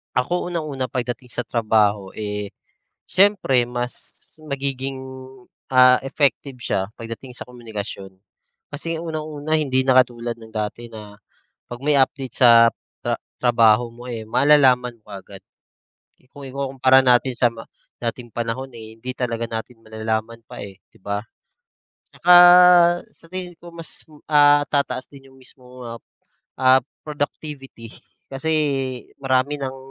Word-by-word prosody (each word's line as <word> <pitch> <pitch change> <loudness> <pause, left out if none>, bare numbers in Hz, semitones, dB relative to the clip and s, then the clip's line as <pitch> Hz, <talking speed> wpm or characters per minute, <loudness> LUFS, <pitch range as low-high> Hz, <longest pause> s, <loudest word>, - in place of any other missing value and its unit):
Ako 170 +9 0
unang-una 155 -7 -3
pagdating 125 +1 -4
sa 125 - -2
trabaho, 105 -4 0
eh, 105 -1 -5 0.6
siyempre 185 -10 +3
mas 120 0 -4 0.5
magiging, 135 -2 -4 0.7
ah, 125 0 +7
effective 135 -2 0
siya 95 -4 -1 0.2
pagdating 115 +3 -8
sa 125 - -10
komunikasyon, 105 -5 -8 0.6
kasi 160 +3 -5
unang-una 155 -1 -3
hindi 130 -4 +1
na 130 - +5
katulad 120 -2 +1
ng 110 -1 -15
dati 115 +2 -5
na 105 -2 -11 0.5
pag 120 +1 -8
may 150 -1 +3
update 135 -1 0
sa 115 -1 +8 0.3
ta - - -1 0.2
trabaho 115 -1 +4
mo, 120 +1 -14
eh, 115 -2 -5
malalaman 125 -2 +3
mo 105 - -29
agad 95 0 -10 0.9
kung 140 -2 -11
ikukumpara 130 -1 +2
natin 125 0 +3
sa 120 0 +2
ma 115 -1 -11 0.3
dating 120 0 -5
panahon, 120 +4 -4
eh, 110 -1 -11
hindi 125 +3 -6
talaga 115 -2 -2
natin 115 +1 -7
malalaman 110 +1 -4
pa, - - -9
eh, 95 -1 -10 0.2
di - - -21
ba? 100 0 -2 0.9
Tsaka 180 +1 +4 0.8
sa 165 - -21
tingin 180 0 -6
ko 175 - -12
mas, 165 -1 -11 0.3
ah, 145 -1 +5
tataas 140 -2 -1
din 135 -1 -15
yung - - -20
mismong 125 0 -19
mga, 115 - -7 0.7
ah, 130 0 +5 0.2
productivity 145 -5 -6 0.4
kasi 160 +4 -3 0.7
marami 135 +2 0
ng 135 0 -4
125 Hz, 130 wpm, -21 LUFS, 115-140 Hz, 0.9 s, sa